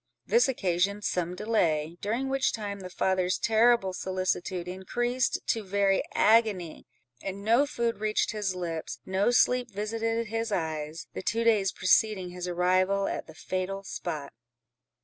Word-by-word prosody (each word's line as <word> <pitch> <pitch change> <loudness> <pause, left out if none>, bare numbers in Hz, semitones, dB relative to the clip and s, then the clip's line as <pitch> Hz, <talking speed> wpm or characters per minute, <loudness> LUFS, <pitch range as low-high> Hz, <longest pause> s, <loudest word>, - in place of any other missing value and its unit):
This 470 - +4
occasioned 200 -3 0
some 180 -2 -1
delay, 170 -7 0
during 230 +6 -1
which 270 0 +1
time 205 -2 -4
the 185 -1 -8
father's 185 0 +1
terrible 225 -3 +3
solicitude 185 -1 -2
increased 240 +7 -1
to 225 - +1
very 195 0 +2
agony; 210 -7 +2 0.3
and 195 +1 -5
no 235 +7 +4
food 235 -3 -1
reached 215 0 +1
his 205 -4 -2
lips, 165 -3 -4
no 190 +4 +1
sleep 250 0 +3
visited 225 +2 -2
his 225 0 -3
eyes, 160 -3 -3
the - - -5
two 230 +4 0
days 210 -4 +3
preceding 190 0 +2
his 180 0 -5
arrival 185 +2 +2
at - - -4
the 160 - -13
fatal 185 +2 -3
spot. 150 - -5
195 Hz, 145 wpm, -28 LUFS, 180-225 Hz, 0.3 s, This